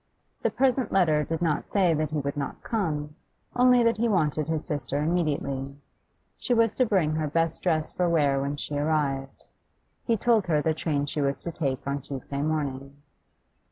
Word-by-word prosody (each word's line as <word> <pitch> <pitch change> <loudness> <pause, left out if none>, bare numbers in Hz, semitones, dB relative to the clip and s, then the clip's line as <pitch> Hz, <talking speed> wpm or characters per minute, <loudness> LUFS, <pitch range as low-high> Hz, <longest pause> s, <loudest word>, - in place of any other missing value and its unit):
The - - +2
present 260 -1 +1
letter 160 -6 +3
did 165 +2 -3
not 155 -3 0
say 185 -5 +3
that 155 -1 -1
he 155 - -3
would 140 -1 -2
not 140 -1 -5
come, 150 -10 -2 0.4
only 250 -1 +5
that 230 -1 +2
he 235 +1 +1
wanted 155 -6 +1
his 160 -1 -1
sister 145 -3 -2
immediately. 145 -4 -1 0.6
She 245 - 0
was 225 -2 +3
to 255 - +3
bring 180 -8 +2
her 155 -1 -1
best 165 +2 0
dress 160 -3 0
for 180 -1 0
wear 145 -5 +2
when 140 +1 -2
she 145 - -5
arrived. 145 -3 -1 0.6
He 230 -2 +1
told 225 -3 +2
her 155 -3 +2
the 160 +2 +1
train 150 -2 -1
she 145 +1 -3
was 140 0 -1
to 170 - -3
take 140 -5 -2
on 140 0 -2
Tuesday 140 0 -5
morning. 140 -3 -2
155 Hz, 185 wpm, -26 LUFS, 145-180 Hz, 0.6 s, only